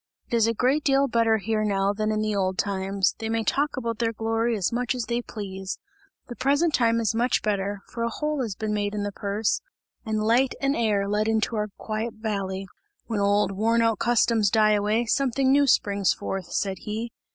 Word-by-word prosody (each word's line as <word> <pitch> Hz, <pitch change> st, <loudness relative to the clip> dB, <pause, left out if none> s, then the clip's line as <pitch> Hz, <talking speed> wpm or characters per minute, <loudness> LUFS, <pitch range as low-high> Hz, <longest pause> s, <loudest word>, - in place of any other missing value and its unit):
It -, -, -6 dB
is 225 Hz, -1 st, +4 dB
a 230 Hz, -, 0 dB
great 265 Hz, +6 st, +2 dB
deal 275 Hz, 0 st, +3 dB
better 230 Hz, -2 st, +2 dB
here 215 Hz, +1 st, -1 dB
now, 200 Hz, -1 st, +1 dB
than 215 Hz, +1 st, -1 dB
in 215 Hz, 0 st, 0 dB
the 215 Hz, -1 st, -1 dB
old 190 Hz, -1 st, 0 dB
times; 195 Hz, -1 st, 0 dB
they 225 Hz, -1 st, -3 dB
may 225 Hz, 0 st, 0 dB
talk 285 Hz, +4 st, 0 dB
about 230 Hz, -3 st, -3 dB
their 230 Hz, -1 st, +1 dB
glory 225 Hz, +1 st, 0 dB
as 190 Hz, -, 0 dB
much 245 Hz, +1 st, 0 dB
as 245 Hz, -, -2 dB
they 235 Hz, +2 st, -1 dB
please. 195 Hz, -4 st, -6 dB, 0.5 s
The 240 Hz, -, -7 dB
present 285 Hz, +6 st, +2 dB
time 230 Hz, -2 st, +3 dB
is 225 Hz, -1 st, +1 dB
much 240 Hz, +3 st, +1 dB
better, 200 Hz, -1 st, -1 dB
for 235 Hz, -, -7 dB
a 235 Hz, -, +1 dB
hole 300 Hz, +3 st, -2 dB
has 220 Hz, -6 st, -3 dB
been 215 Hz, +1 st, -3 dB
made 205 Hz, 0 st, -1 dB
in 205 Hz, -, -2 dB
the 205 Hz, -, -2 dB
purse 205 Hz, +2 st, -1 dB, 0.4 s
and 215 Hz, -2 st, -1 dB
light 245 Hz, +4 st, +3 dB
and 275 Hz, +1 st, +1 dB
air 210 Hz, -4 st, +1 dB
let 210 Hz, +1 st, 0 dB
into 225 Hz, +1 st, +1 dB
our 210 Hz, -1 st, -1 dB
quiet 220 Hz, +1 st, -4 dB
valley. 195 Hz, -3 st, -3 dB, 0.4 s
When 225 Hz, -3 st, -2 dB
old 200 Hz, 0 st, +2 dB
worn 225 Hz, +4 st, +2 dB
out 225 Hz, -2 st, +1 dB
customs 230 Hz, -3 st, +3 dB
die 215 Hz, 0 st, +4 dB
away, 210 Hz, +3 st, +1 dB
something 265 Hz, +2 st, +1 dB
new 285 Hz, +1 st, +4 dB
springs 200 Hz, -5 st, +3 dB
forth!" 190 Hz, -3 st, -5 dB
said 190 Hz, -2 st, -1 dB
he. 220 Hz, +2 st, -4 dB
220 Hz, 210 wpm, -25 LUFS, 205-235 Hz, 0.5 s, is